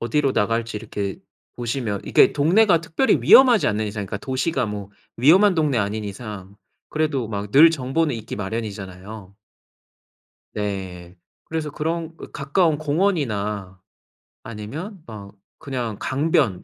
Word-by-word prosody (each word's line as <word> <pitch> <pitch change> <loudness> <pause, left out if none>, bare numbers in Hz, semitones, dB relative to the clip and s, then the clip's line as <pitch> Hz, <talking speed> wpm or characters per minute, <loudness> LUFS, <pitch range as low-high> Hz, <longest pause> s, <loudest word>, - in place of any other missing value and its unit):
어디로 135 +4 +1
나갈지 115 +1 -1
이렇게 100 -2 -5 0.4
보시면 120 -4 -3
이게 - - +4
동네가 170 +4 +4
특별히 170 +11 +1
위험하지 250 -6 +6
않는 105 +1 0
이상 100 -1 -5
그러니까 105 - -4
도시가 130 -1 -1
뭐 100 -1 -6 0.3
위험한 180 - +5
동네가 140 -10 +1
아닌 105 +1 -4
이상 100 -2 -8 0.3
그래도 150 -7 -1
막 100 -1 -5
늘 160 +4 +8
정보는 145 0 -1
있기 110 -2 -7
마련이잖아요. 100 -1 -6 1.2
네. 95 -4 -5 0.3
그래서 160 -2 -4
그런 165 +2 -3
그 - - -11
가까운 150 +2 +1
공원이나 110 - -1 0.6
아니면 145 - -7
막 100 -3 -10 0.2
그냥 125 -6 -4
강변 135 - 0
115 Hz, 305 characters per minute, -22 LUFS, 105-155 Hz, 1.2 s, 늘